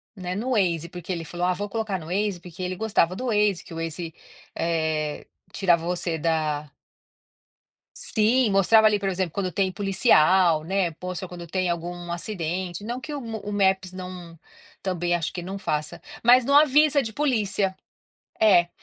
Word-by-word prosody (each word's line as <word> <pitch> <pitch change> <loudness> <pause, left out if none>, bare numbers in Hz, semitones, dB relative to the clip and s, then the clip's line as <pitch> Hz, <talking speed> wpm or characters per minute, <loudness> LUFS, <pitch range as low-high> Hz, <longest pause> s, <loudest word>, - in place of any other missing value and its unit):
né, 180 -1 -4
no 245 +5 -2
Waze, 170 -7 +1
porque 180 +1 -7
ele 170 -2 -3
falou: 175 +3 -3
"Ah, 185 - +2
vou 205 +2 -4
colocar 215 -4 -2
no 160 - -10
Waze", 195 0 -1
porque 180 +1 -11
ele 185 0 -2
gostava 185 -4 +1
do 255 +5 -4
Waze, 210 -4 +2
que 165 - -12
o - - -7
Waze, 165 0 -5 0.4
eh, 160 -2 -1 0.3
tirava 175 -4 +2
você 175 -2 -1
da 155 -2 -1 1.3
sim, 230 +2 +2
mostrava 215 +3 +5
ali, 210 -1 +2
por 195 -1 -1
exemplo, 185 -3 -1
quando 185 -2 -2
tem 190 0 0
policial, 185 -5 +4
né. 185 0 0
Poxa, 180 +2 -6
quando 175 -1 -9
tem 185 +1 -1
algum 175 0 -4
acidente. 175 0 -4
Não 240 +3 -4
que 300 +3 -7
o 290 - -3
o 220 -4 -6
Maps 190 -2 +1
não 180 -3 -9 0.4
também 175 -2 -1
acho 170 -1 -3
que 175 - -4
não 195 +3 -6
faça, 150 -5 -3 0.2
mas 245 +1 +6
não 280 - +3
avisa 295 0 +5
de 220 -3 -5
polícia. 210 -9 0 0.7
É, 180 -5 +5
185 Hz, 170 wpm, -25 LUFS, 170-210 Hz, 1.3 s, mas